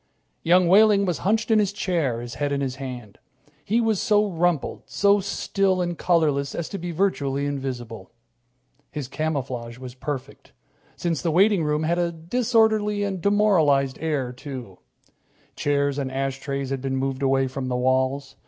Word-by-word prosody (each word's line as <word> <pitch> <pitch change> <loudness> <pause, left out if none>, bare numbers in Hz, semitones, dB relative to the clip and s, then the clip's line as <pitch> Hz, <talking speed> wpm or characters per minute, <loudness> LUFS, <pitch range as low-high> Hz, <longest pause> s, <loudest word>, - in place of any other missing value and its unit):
Young 180 +1 +4
Wehling 200 +2 +5
was 180 -3 -1
hunched 220 +4 0
in 220 - +5
his 205 -2 +1
chair, 165 - -1
his 120 0 -7
head 145 -1 -2
in 140 - 0
his 130 -2 -3
hand. 125 -6 -8 0.4
He 225 +4 +1
was 220 -4 +1
so 210 0 +3
rumpled, 170 -3 0
so 200 0 +3
still 195 -1 0
and 175 -1 -1
colorless 155 -5 +1
as 170 - -3
to 200 - -5
be 175 - -5
virtually 145 -6 0
invisible. 125 -8 -5 0.8
His 145 -4 -5
camouflage 130 -6 -3
was 130 -1 -9
perfect, 135 +1 -7 0.4
since 170 -3 -2
the 170 - 0
waiting 190 +2 +4
room 150 +1 0
had 170 +2 +1
a 170 -1 0
disorderly 215 +3 +1
and 195 -3 -3
demoralized 165 -10 +3
air, 145 -6 -1
too. 125 - -8 0.8
Chairs 140 -1 0
and 135 -2 -3
ashtrays 135 0 -3
had 135 -1 -2
been 135 0 -2
moved 135 0 -2
away 135 0 +2
from 130 0 -4
the 125 - -1
walls. 130 +2 0
150 Hz, 160 wpm, -24 LUFS, 135-185 Hz, 0.8 s, Wehling